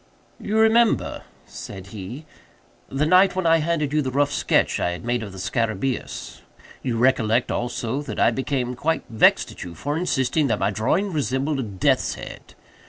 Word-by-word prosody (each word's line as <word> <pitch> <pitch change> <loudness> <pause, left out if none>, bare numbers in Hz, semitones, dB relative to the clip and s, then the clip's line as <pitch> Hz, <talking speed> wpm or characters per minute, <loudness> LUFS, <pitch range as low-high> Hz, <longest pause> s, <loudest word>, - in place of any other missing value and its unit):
"You 215 +2 -2
remember;" 225 +1 +3 0.2
said 95 -1 -9
he, 110 +9 -7 0.6
"the 135 +3 0
night 185 +4 +5
when 185 -1 -1
I 165 0 +5
handed 155 -2 -1
you 150 - +3
the 130 - -2
rough 145 +2 +1
sketch - - +1
I 90 - 0
had 90 - -8
made 120 0 0
of 105 -3 -6
the 95 - -11
scarabæus. 115 +6 -3 0.4
You 120 -3 -2
recollect 120 -2 +2
also, 120 +2 -2
that 150 - -6
I - - +4
became 130 -2 -2
quite 160 +6 -1
vexed 110 - +4
at - - -9
you 85 -1 -9
for 145 - -3
insisting 150 -3 +1
that - - +1
my 100 - 0
drawing 165 - 0
resembled 140 0 -1
a - - -1
death's 100 -4 0
head. - - -10
130 Hz, 175 wpm, -23 LUFS, 115-155 Hz, 0.6 s, night